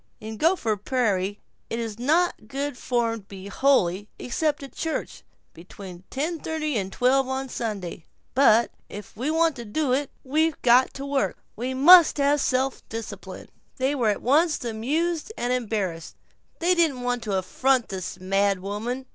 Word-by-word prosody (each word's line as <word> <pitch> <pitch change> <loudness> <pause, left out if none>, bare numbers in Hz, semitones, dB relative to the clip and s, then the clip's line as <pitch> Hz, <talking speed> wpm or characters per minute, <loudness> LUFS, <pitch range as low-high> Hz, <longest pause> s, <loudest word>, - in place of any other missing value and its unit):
In 220 0 -7
Gopher 270 - +1
Prairie 205 -3 -1 0.3
it 230 - -3
is 225 -2 -5
not 305 -3 +1
good 280 +3 -3
form 235 -2 -1
to 195 - -19
be 195 0 -9
holy 205 -5 +2
except 295 +4 -1
at 275 - -9
a - - -27
church, 320 -1 -4 0.3
between 180 +1 -11
ten 315 +5 -2
thirty 305 -3 -3
and 195 -3 -2
twelve 255 +4 +2
on 265 0 -3
Sunday. 200 -9 -5 0.3
"But 235 -4 +4 0.2
if 205 -1 -10
we 260 +6 -2
want 325 -1 +2
to 240 - -6
do 255 +5 -1
it, 280 +1 0
we've 310 +3 +1
got 250 +1 +5
to 275 - -6
work; 280 -1 -1 0.2
we 255 +3 -3
must 335 +5 +8
have 285 0 +2
self 260 0 0
discipline." 225 0 -7 0.3
They 265 +2 +1
were 245 -6 +1
at 205 - -2
once 300 +2 +2
amused 300 - -1
and 245 +1 0
embarrassed. 205 -9 -3 0.4
They 350 +2 +2
did 335 -5 +2
not 250 - -8
want 245 -1 -1
to 200 -3 0
affront 255 +6 +1
this 185 -1 -5
mad 195 +1 +1
woman. 220 +7 -4
250 Hz, 170 wpm, -25 LUFS, 210-285 Hz, 0.4 s, must